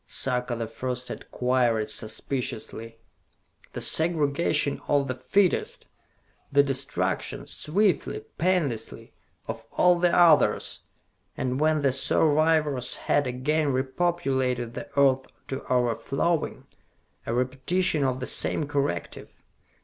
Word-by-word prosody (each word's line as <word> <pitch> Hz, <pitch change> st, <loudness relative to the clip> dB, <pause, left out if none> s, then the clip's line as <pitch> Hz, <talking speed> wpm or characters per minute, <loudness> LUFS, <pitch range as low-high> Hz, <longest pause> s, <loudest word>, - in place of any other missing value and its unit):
Sarka 125 Hz, -1 st, -1 dB
the 115 Hz, 0 st, -3 dB
First 125 Hz, +3 st, -5 dB
had -, -, -8 dB
queried 125 Hz, -4 st, +1 dB
suspiciously. 115 Hz, +1 st, -4 dB, 0.8 s
"The -, -, -5 dB
segregation 155 Hz, -2 st, +1 dB
of 140 Hz, -1 st, +2 dB
the 130 Hz, -, -1 dB
fittest! 185 Hz, +9 st, 0 dB, 0.7 s
The 140 Hz, 0 st, +5 dB
destruction, 130 Hz, -10 st, -2 dB
swiftly, 200 Hz, -, 0 dB, 0.2 s
painlessly, 155 Hz, -12 st, -1 dB, 0.3 s
of 115 Hz, 0 st, -5 dB
all 180 Hz, -1 st, +5 dB
the 175 Hz, 0 st, +4 dB
others! 170 Hz, -4 st, +4 dB, 0.6 s
And 130 Hz, 0 st, -1 dB
when 155 Hz, -1 st, +2 dB
the 135 Hz, -, +3 dB
survivors 150 Hz, -1 st, +2 dB
have 145 Hz, -2 st, +2 dB
again 140 Hz, +4 st, 0 dB
re 130 Hz, +1 st, +1 dB
populated 130 Hz, -6 st, -1 dB
the -, -, -7 dB
earth 135 Hz, -1 st, +3 dB, 0.2 s
to 135 Hz, 0 st, -4 dB
overflowing 130 Hz, +7 st, 0 dB, 0.6 s
a 115 Hz, -, -1 dB
repetition 140 Hz, +7 st, 0 dB
of 130 Hz, -1 st, 0 dB
the 130 Hz, -, -3 dB
same 150 Hz, -, +1 dB
corrective! 140 Hz, -, -3 dB
135 Hz, 110 wpm, -26 LUFS, 125-155 Hz, 0.8 s, The